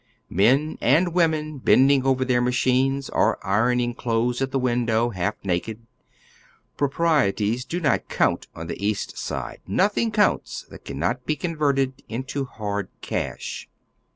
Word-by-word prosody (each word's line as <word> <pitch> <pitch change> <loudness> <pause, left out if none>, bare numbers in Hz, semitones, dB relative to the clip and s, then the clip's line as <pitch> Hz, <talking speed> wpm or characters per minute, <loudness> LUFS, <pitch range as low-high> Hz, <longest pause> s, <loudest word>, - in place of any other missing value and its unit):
Men 130 - +2
and 165 +8 +3
women 155 -4 +1
bending 135 +1 +4
over 130 -1 +2
tlieir 125 -1 +2
machines, 130 +2 +1
or - - +2
ii - - -3
oning 120 +3 +2
clothes 120 +1 0
at 135 - 0
the 135 - -1
window, 120 -2 +1
half 100 +1 -2
naked. 105 +5 -3 0.9
Proprieties 135 -6 +1
do 175 - -3
not 155 -5 0
count - - +1
on 80 - -6
the 85 +3 -6
East 105 0 -1
Side; - - -5
notliing 205 - +2
counts 215 - +1
that - - -12
can - - -6
not - - -2
be 155 - +1
converted 140 -5 0
into 130 +4 -3
hard 100 -4 -4
cash. - - -4
130 Hz, 145 wpm, -24 LUFS, 115-145 Hz, 0.9 s, bending